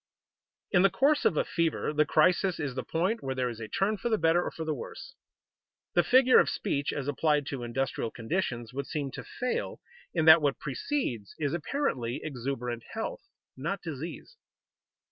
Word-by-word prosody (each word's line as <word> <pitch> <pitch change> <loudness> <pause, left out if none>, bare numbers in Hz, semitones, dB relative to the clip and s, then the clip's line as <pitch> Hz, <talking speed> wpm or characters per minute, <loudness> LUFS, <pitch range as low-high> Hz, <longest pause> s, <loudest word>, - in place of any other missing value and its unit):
_ - - -65 0.7
In 180 - +5
the 195 - +6
course 285 +9 +2
of 155 - +3
a - - +2
fever 165 -2 0
the 150 0 +3
crisis 180 +4 +3
is 145 -4 -2
the 130 - -3
point 185 +8 -1
where 135 -1 -3
there 125 -1 0
is 115 -2 -7
a 110 - -5
turn 200 - 0
for 235 - -2
the 220 - +2
better 165 0 +3
or - - -2
for 160 - -6
the 155 - 0
worse. 225 - -8 0.8
The - - +5
figure 255 0 +6
of - - +3
speech 145 -8 -1
as 140 -1 -4
applied 145 0 +1
to 135 -3 -4
industrial 120 0 -2
conditions 120 -2 -3
would 140 +1 -4
seem 145 -3 -3
to - - -7
fail, 250 0 -3 0.3
in 160 -3 0
that 160 0 +9
what 145 -2 +1
precedes 130 - -3
is 145 -1 -1
apparently 155 - -1
exuberant 125 -4 -3
health, - - -4 0.3
not 170 +9 -3
disease. 165 - -7
150 Hz, 185 wpm, -29 LUFS, 130-185 Hz, 0.8 s, that